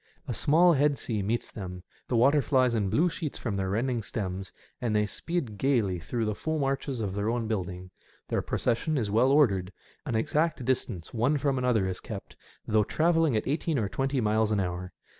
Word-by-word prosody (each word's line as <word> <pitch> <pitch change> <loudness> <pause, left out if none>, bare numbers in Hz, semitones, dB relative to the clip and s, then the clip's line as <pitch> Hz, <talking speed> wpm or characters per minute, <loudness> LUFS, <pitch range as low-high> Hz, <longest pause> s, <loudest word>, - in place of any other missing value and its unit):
A - - -2
small 170 +4 +4
head 145 -1 +2
sea 110 -4 -2
meets 110 +5 -2
them^ 90 -3 -7 0.2
the 125 - -1
water 140 +5 +5
flies 130 -4 +2
in 105 -4 0
bine 150 - +3
sheets 165 -3 -4
from 110 -5 -3
their 95 -1 -1
rending 120 +4 0
stems, 95 -3 -4 0.3
and 115 -4 0
they 105 0 +3
speed 130 - -4
gaily 115 -10 +1
through 110 +4 -2
foam 155 +6 -2
arches 135 -2 -1
of 100 -3 -2
their 100 +2 -1
own 115 -1 -1
building. 90 -3 -4 0.4
Their - - 0
procession 135 +6 0
is 110 -5 -1
well 120 +5 +4
ordered. 100 -11 +3 0.4
An 120 - -1
exact 150 +4 0
distance 100 -9 -2
one 125 +6 +2
from 135 -1 0
another 125 -6 +2
is 95 0 -3
kept, 110 -5 -8 0.3
though 110 -1 +3
travelling 165 0 +2
at 110 - -2
eighteen 155 +2 0
or 110 -5 0
twenty 135 +5 -1
miles 110 -1 +2
an 105 - +2
hour. 90 0 -3
115 Hz, 195 wpm, -28 LUFS, 100-140 Hz, 0.4 s, water